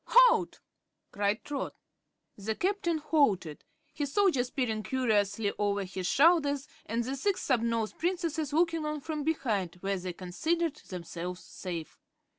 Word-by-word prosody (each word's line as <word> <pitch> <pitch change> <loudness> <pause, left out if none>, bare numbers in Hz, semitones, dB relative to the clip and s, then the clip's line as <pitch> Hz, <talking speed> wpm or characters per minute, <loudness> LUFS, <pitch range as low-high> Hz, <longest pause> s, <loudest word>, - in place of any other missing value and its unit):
"Halt!" - - +5 0.5
cried 205 +2 0
Trot. 285 -2 -4 0.6
The 215 +2 -3
Captain 365 - 0
halted, 215 - +1 0.3
his 290 -3 -3
soldiers 320 -9 +3
peering 230 -6 -1
curiously 210 -4 +1
over 205 -1 +1
his 185 -1 -4
shoulders 285 - +4 0.2
and 230 +2 0
the 260 +3 -3
Six 385 +8 -1
Snubnosed 230 -3 +1
Princesses 335 -3 -1
looking 330 +1 +2
on 300 -1 -2
from 305 0 -3
behind, 220 - 0
where 195 -1 -1
they 180 0 -4
considered 315 - -1
themselves 180 0 -6
safe. 170 -4 -6
255 Hz, 130 wpm, -30 LUFS, 200-315 Hz, 0.6 s, Halt